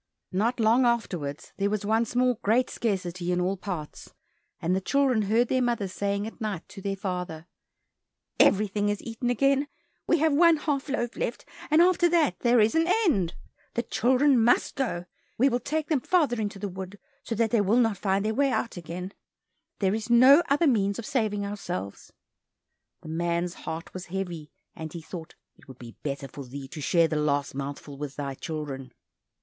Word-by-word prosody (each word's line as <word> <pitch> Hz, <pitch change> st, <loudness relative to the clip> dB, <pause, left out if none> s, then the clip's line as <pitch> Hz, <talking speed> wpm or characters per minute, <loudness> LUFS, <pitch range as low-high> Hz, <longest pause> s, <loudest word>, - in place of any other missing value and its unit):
Not 225 Hz, +6 st, 0 dB
long 230 Hz, +3 st, +4 dB
afterwards, 180 Hz, -12 st, -1 dB
there 200 Hz, 0 st, +1 dB
was 210 Hz, 0 st, -2 dB
once 225 Hz, +3 st, +1 dB
more 250 Hz, -2 st, +2 dB
great 235 Hz, +5 st, +2 dB
scarcity 180 Hz, -5 st, -2 dB
in 180 Hz, -, +1 dB
all 185 Hz, +2 st, 0 dB
parts, 180 Hz, -6 st, -7 dB, 0.5 s
and 175 Hz, +3 st, 0 dB
the 190 Hz, -, 0 dB
children 265 Hz, 0 st, +2 dB
heard 225 Hz, +4 st, +2 dB
their 255 Hz, +2 st, +1 dB
mother 235 Hz, -5 st, 0 dB
saying 200 Hz, +2 st, -2 dB
at 225 Hz, +2 st, -9 dB
night 210 Hz, -6 st, -3 dB
to 195 Hz, -, -10 dB
their 195 Hz, 0 st, -2 dB
father, 180 Hz, -5 st, -4 dB, 0.9 s
"Everything 205 Hz, 0 st, +3 dB
is 205 Hz, -1 st, -2 dB
eaten 230 Hz, +1 st, -3 dB
again, 275 Hz, +3 st, +2 dB, 0.4 s
we 340 Hz, -, +4 dB
have 315 Hz, -1 st, +2 dB
one 335 Hz, +2 st, +6 dB
half 290 Hz, -2 st, -2 dB
loaf 240 Hz, -4 st, -2 dB
left, -, -, -3 dB, 0.2 s
and 315 Hz, +2 st, +6 dB
after 350 Hz, -1 st, +4 dB
that 330 Hz, -4 st, +2 dB
there 240 Hz, 0 st, +4 dB
is 215 Hz, +1 st, +4 dB
an 325 Hz, +1 st, +2 dB, 0.2 s
end. 190 Hz, -, +1 dB, 0.4 s
The 235 Hz, -, 0 dB
children 255 Hz, +1 st, +3 dB
must 240 Hz, -, +3 dB
go, 230 Hz, -11 st, -2 dB, 0.3 s
we 265 Hz, +4 st, +4 dB
will 245 Hz, -1 st, 0 dB
take 305 Hz, +5 st, -2 dB
them 295 Hz, -5 st, +2 dB
farther 285 Hz, -8 st, +2 dB
into 205 Hz, -1 st, -3 dB
the 205 Hz, +1 st, -4 dB
wood, 190 Hz, +1 st, -7 dB, 0.2 s
so 230 Hz, -, -4 dB
that 225 Hz, 0 st, +1 dB
they 230 Hz, -, +3 dB
will 205 Hz, +4 st, +2 dB
not 225 Hz, -4 st, +3 dB
find 195 Hz, +1 st, 0 dB
their 220 Hz, -, 0 dB
way 275 Hz, +3 st, +2 dB
out 235 Hz, -5 st, -2 dB
again; 180 Hz, +3 st, -6 dB, 0.6 s
there 195 Hz, -1 st, +1 dB
is 220 Hz, +2 st, -3 dB
no 260 Hz, +6 st, +8 dB
other 290 Hz, +4 st, +3 dB
means 200 Hz, -8 st, +2 dB
of 235 Hz, -, -6 dB
saving 215 Hz, -6 st, -1 dB
ourselves!" 175 Hz, -, -6 dB, 0.9 s
The -, -, -9 dB
man's 170 Hz, +1 st, -1 dB
heart 160 Hz, +1 st, -7 dB
was 185 Hz, 0 st, -7 dB
heavy, 175 Hz, -5 st, -5 dB, 0.3 s
and 160 Hz, -1 st, -7 dB
he 170 Hz, -, -7 dB
thought 160 Hz, 0 st, -9 dB, 0.2 s
"it -, -, -21 dB
would 130 Hz, -3 st, -12 dB
be 120 Hz, -2 st, -11 dB
better 140 Hz, -1 st, -4 dB
for 140 Hz, +2 st, -9 dB
thee 135 Hz, +2 st, -8 dB
to 155 Hz, 0 st, -7 dB
share 165 Hz, +3 st, +3 dB
the 155 Hz, -, -2 dB
last 145 Hz, -2 st, 0 dB
mouthful 140 Hz, +1 st, -6 dB
with 145 Hz, -2 st, -5 dB
thy 140 Hz, -1 st, -4 dB
children." 135 Hz, -3 st, -6 dB
205 Hz, 190 wpm, -27 LUFS, 175-245 Hz, 0.9 s, no